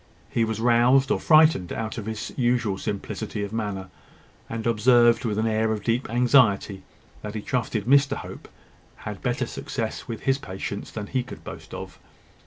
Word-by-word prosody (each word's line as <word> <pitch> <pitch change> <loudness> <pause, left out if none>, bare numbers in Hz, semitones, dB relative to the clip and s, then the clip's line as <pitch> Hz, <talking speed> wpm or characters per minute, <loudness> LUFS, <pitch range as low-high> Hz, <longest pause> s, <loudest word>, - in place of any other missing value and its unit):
He 115 - +1
was 110 -1 -3
roused 125 +3 +4
or - - +2
frightened 155 - +4
out 115 +1 -4
of 110 - -7
his 110 -1 -5
usual 120 -6 +1
simplicity 100 0 -4
of 100 +1 -5
manner, 100 -4 -4 0.6
and 115 -1 -4
observed, 120 +1 +4
with 105 -2 -1
an 110 - +1
air 110 0 +1
of 105 -2 -3
deep 120 +2 0
anxiety, 115 -5 +3 0.4
that 105 0 -6
he 105 - -3
trusted 115 -5 -2
Mr 140 +2 +4
Hope - - -9 0.6
had - - -6
better - - -1
success - - -5
with 115 -2 -5
his 135 0 +1
patients 100 -1 -6
than 105 -2 -6
he 130 +5 -1
could 130 - -10
boast - - -9
of. - - -8
115 Hz, 175 wpm, -25 LUFS, 105-125 Hz, 0.6 s, roused